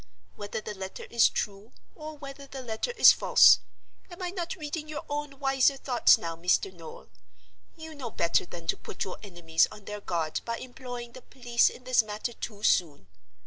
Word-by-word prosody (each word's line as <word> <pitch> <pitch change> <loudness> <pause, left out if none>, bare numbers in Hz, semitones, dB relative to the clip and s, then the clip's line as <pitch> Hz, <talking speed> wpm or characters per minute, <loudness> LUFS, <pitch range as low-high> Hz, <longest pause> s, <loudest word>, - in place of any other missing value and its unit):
Whether 205 +1 -5
the 210 - -6
letter 190 -1 -7
is 235 -1 +5
true, 205 +2 -5 0.2
or 310 -1 -9
whether 275 -1 -10
the 270 -1 -8
letter 220 - -3
is - - +10
false—am 350 -2 +3
I 360 -1 -3
not 345 -3 -4
reading 310 -2 -5
your 305 -1 -6
own 290 -1 -4
wiser 270 0 +2
thoughts 250 -3 +4
now, 165 -1 -5
Mr. 180 +3 +1
Noel?—you 90 - -14
know 270 -6 -6
better 170 -3 +1
than 170 -1 -9
to - - 0
put - - -6
your 185 - -7
enemies 175 -5 +1
on 210 -1 -13
their 210 0 -6
guard 165 -5 -2
by 230 0 -3
employing 245 -1 -8
the 255 - -12
police 240 -3 +1
in 250 - -13
this 255 -1 +4
matter 215 +2 -5
too 210 -2 -8
soon. 145 - +1
235 Hz, 180 wpm, -28 LUFS, 180-275 Hz, 0.2 s, is